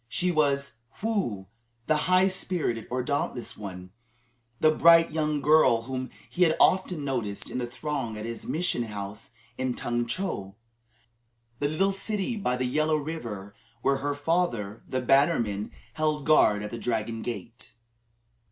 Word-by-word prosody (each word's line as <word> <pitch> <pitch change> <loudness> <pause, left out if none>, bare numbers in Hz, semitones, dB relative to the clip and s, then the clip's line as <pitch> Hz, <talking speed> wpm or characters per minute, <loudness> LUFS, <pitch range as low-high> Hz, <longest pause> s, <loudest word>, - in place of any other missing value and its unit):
She 180 +9 +1
was 140 -6 +1 0.2
Woo 190 - -1 0.4
(the 155 - +3
"high 185 +1 +6
spirited" 180 - -1
or 125 0 -1
"dauntless 135 -3 -2
one"), 90 -3 -8 0.7
the 155 - +5
bright 165 +1 +6
young 150 -2 0
girl 145 -6 +5
whom 130 +1 -4 0.2
he 180 - -6
had 165 -3 +5
often 180 -5 +3
noticed 115 -7 -2
in - - -2
the 120 - -2
throng 125 -3 -4
at 105 - -5
his 115 0 -5
mission 170 -6 0
house 105 -1 -6 0.3
in 130 -1 -1
Tung 120 0 -1
Chow, 115 - -3 1.0
the 145 - +1
little 195 +6 +2
city 205 +3 -2
by 160 - 0
the 130 - -1
Yellow 155 +5 +1
River, 115 -11 -5 0.3
where 135 0 +3
her 145 +1 -2
father, 145 - -1
the 130 - -1
bannerman, 120 -7 +2 0.2
held 155 -1 0
guard 105 -9 +4
at 105 - -5
the 115 - -5
Dragon 115 -1 -2
Gate. 115 0 -7
135 Hz, 150 wpm, -27 LUFS, 115-155 Hz, 1.0 s, high